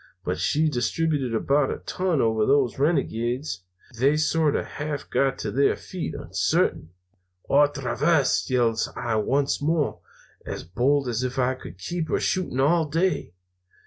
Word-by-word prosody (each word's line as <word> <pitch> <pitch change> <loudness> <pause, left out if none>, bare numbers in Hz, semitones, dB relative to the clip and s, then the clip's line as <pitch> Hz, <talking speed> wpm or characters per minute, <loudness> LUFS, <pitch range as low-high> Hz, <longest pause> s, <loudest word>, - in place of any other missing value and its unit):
But - - -2
she 150 - +2
distributed 140 -1 0
about 140 +4 +2
a - - -3
ton 180 -5 -1
over 110 -1 +2
those 135 0 +2
renegades. 125 - 0 0.4
They 140 +4 +3
sort 155 -1 +2
of - - -1
half 145 -1 -5
got 135 -1 +1
to - - -4
their 140 +1 +3
feet 180 - -6
uncertain. 80 - 0 0.6
"'Otra 140 -4 +2
vez!' 150 -5 +2
yells 120 -3 +1
I 115 -2 -1
once 135 +7 0
more, 155 0 0 0.4
as - - -6
bold 130 - +1
as 120 -1 -1
if 130 +1 -3
I 130 0 +2
could 130 -7 -11
keep 160 - -4
her - - +1
shooting 180 -9 -1
all 155 +3 +3
day. 165 - 0
140 Hz, 150 wpm, -25 LUFS, 120-155 Hz, 0.6 s, They